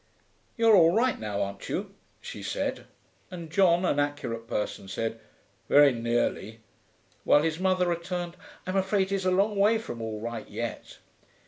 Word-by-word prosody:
'You're 230 -1 +5
all 170 -1 +5
right 250 +3 +2
now, 105 -2 -2
aren't 100 0 -7
you?' - - -3 0.3
she - - -8
said, - - -3 0.4
and 170 -3 -8
John, 180 0 +4
an 145 - +1
accurate 145 -6 -3
person, 105 -2 -3
said, 115 +3 -3 0.5
'Very 145 -1 +6
nearly,' 115 -1 -2 0.6
while 145 - +4
his 160 0 -1
mother 185 -1 +2
returned, 175 0 -3 0.3
'I'm 185 +1 -1
afraid 190 0 +1
he's 195 -1 -1
a - - +3
long 200 +3 +2
way 210 +3 +4
from 120 - -7
all 110 -1 -4
right 115 0 -6
yet.' - - -6
165 Hz, 155 wpm, -27 LUFS, 115-190 Hz, 0.6 s, Very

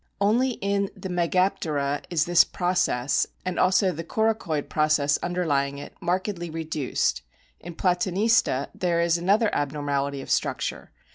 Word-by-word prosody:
Only 235 +6 +2
in 200 -2 -1
the 190 - -6
Megaptera 170 -5 0
is 165 -2 +1
this 175 -1 +6
process, 175 -8 0 0.2
and 185 -1 -2
also 190 0 +3
the 165 0 -6
coracoid 220 -7 -1
process 150 -2 +2
under 175 0 -2
lying 140 -2 0
it, 140 - -9
markedly 180 -1 -2
reduced. 155 - -1 0.4
In 175 - -9
Platanista 180 - +1
there 175 -2 0
is 170 0 +2
another 205 +5 +2
abnormality 140 -1 -1
of - - -7
structure. - - -1
175 Hz, 135 wpm, -25 LUFS, 145-190 Hz, 0.4 s, this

